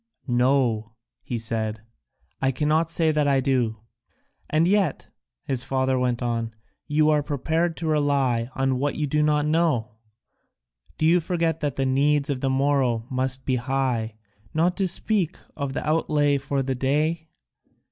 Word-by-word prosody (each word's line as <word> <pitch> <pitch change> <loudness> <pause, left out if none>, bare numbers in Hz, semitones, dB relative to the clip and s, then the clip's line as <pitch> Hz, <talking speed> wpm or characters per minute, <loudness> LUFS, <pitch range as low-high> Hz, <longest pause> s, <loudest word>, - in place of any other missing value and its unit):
"No," 120 -4 +1 0.3
he 120 - -4
said, 110 -1 -2 0.6
"I 135 - +2
cannot 155 +5 +1
say 165 -1 +2
that 150 -1 +1
I 135 -1 +3
do." 125 -5 0 0.7
"And 155 +2 +3
yet," 195 -5 0 0.3
his 130 -2 -2
father 130 -1 0
went 125 -1 0
on, 115 -1 -2 0.3
"you 155 0 +3
are 150 -1 +3
prepared 160 +4 -1
to 170 - -5
rely 140 -6 +1
on 135 -1 0
what 145 +2 -1
you 150 - -1
do 150 +2 +1
not 150 -1 +2
know? 150 -8 +1 1.1
Do 155 - 0
you 170 +3 +5
forget 165 -1 -1
that 145 -3 -2
the 135 - 0
needs 140 +2 +2
of 130 -2 -3
the 135 - +1
morrow 130 -4 +1
must 130 0 -1
be 130 -1 +1
high, 125 -3 -1 0.4
not 175 +3 +2
to 195 -2 +1
speak 190 -1 0 0.2
of 140 -3 -3
the 150 - -4
outlay 150 -2 +2
for 140 0 -1
the 130 0 -1
day?" 150 +5 0
140 Hz, 155 wpm, -24 LUFS, 125-155 Hz, 1.1 s, you